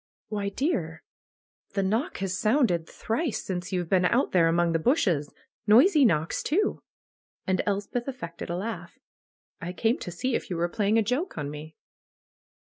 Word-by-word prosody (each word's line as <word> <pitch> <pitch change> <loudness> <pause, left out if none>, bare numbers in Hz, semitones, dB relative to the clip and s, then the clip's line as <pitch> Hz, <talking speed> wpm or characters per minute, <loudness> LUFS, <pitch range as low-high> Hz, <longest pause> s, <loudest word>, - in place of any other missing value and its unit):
''Why, 205 -1 -1
dear, 165 - -1 0.7
the 195 - 0
knock 225 - -1
has 185 -1 -2
sounded 215 - +2
thrice 235 +3 -2
since 180 -2 -4
you've 180 -2 -1
been 185 +1 +3
out 240 +8 +2
there 170 -3 +4
among 170 +1 +2
the 165 - +1
bushes; 170 - +1 0.4
noisy 275 - +6
knocks, 160 -7 +1
too!" 400 +7 0 0.6
and 185 -1 +1
Elspeth 205 +5 -2
affected 235 -13 -6
a 175 - -2
laugh. 220 +5 -5 0.6
"I 175 +2 -4
came 225 +7 +1
to - - -6
see 215 +9 -2
if - - -2
you 180 - -2
were 170 +1 0
playing 210 +2 +1
a 225 - +4
joke 250 - -2
on 145 -1 -3
me." 150 +1 -9
195 Hz, 165 wpm, -27 LUFS, 170-240 Hz, 0.7 s, noisy